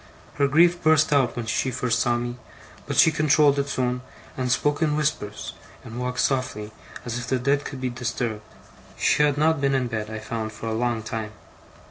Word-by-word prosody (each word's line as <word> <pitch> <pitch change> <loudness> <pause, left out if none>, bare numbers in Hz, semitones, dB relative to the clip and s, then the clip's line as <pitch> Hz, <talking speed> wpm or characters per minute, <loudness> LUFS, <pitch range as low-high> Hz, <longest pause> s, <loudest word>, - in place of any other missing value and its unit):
Her 140 -1 +3
grief 170 +5 +4
burst 155 -1 +4
out 135 -4 +2
when 120 -1 -4
she 110 +4 0
first 125 -2 0
saw 120 0 +2
me; 120 +1 -4 0.5
but - - -3
she 160 - +7
controlled 150 -2 +4
it 140 0 -1
soon, 125 -2 -1 0.3
and 125 -1 -1
spoke 145 +4 +1
in 150 -2 +2
whispers, 145 -9 -2 0.3
and 115 +1 -8
walked 125 0 -1
softly, 130 -6 -1 0.3
as 120 0 -3
if 120 - -6
the 130 - +1
dead 140 +3 +1
could 135 - -6
be 130 -1 -1
disturbed. 120 -2 -3 0.6
She - - +2
had 145 -1 +3
not 155 0 +2
been 135 -1 +2
in 130 -1 +1
bed, 110 -3 -4
I 110 - -5
found, 110 0 -4
for 110 - -8
a 110 - -1
long 120 -1 -1
time. 110 -1 -5
125 Hz, 200 wpm, -24 LUFS, 115-145 Hz, 0.6 s, she